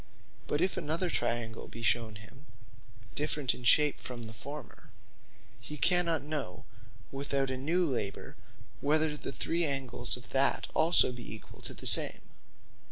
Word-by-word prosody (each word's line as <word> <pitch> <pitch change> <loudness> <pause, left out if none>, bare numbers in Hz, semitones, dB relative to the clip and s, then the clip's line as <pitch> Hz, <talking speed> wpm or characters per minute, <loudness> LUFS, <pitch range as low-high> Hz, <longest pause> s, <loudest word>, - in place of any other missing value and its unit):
But 145 - -1
if 185 +1 +1
another 170 +1 -1
triangle 115 -1 -3
be 115 - -11
shewn 115 -2 0
him 110 +8 -14 0.7
different 150 -2 -1
in 125 - -12
shape 150 +4 +3
from 120 -2 -8
the 110 0 -8
former, 140 +2 -10 0.7
he 150 +5 -9
cannot 170 -3 +2
know 145 -11 -6 0.5
without 135 -1 -2
a - - -3
new 170 +7 0
labour, 105 -8 -5 0.4
whether 155 +1 +1
the 150 - -6
three 165 +7 -1
angles 130 -5 0
of 125 - -14
that 135 +1 +2
also 160 -4 +4
be 120 -4 -9
equall 110 - -14
to - - -6
the - - -11
same. - - +8
140 Hz, 150 wpm, -30 LUFS, 120-155 Hz, 0.7 s, same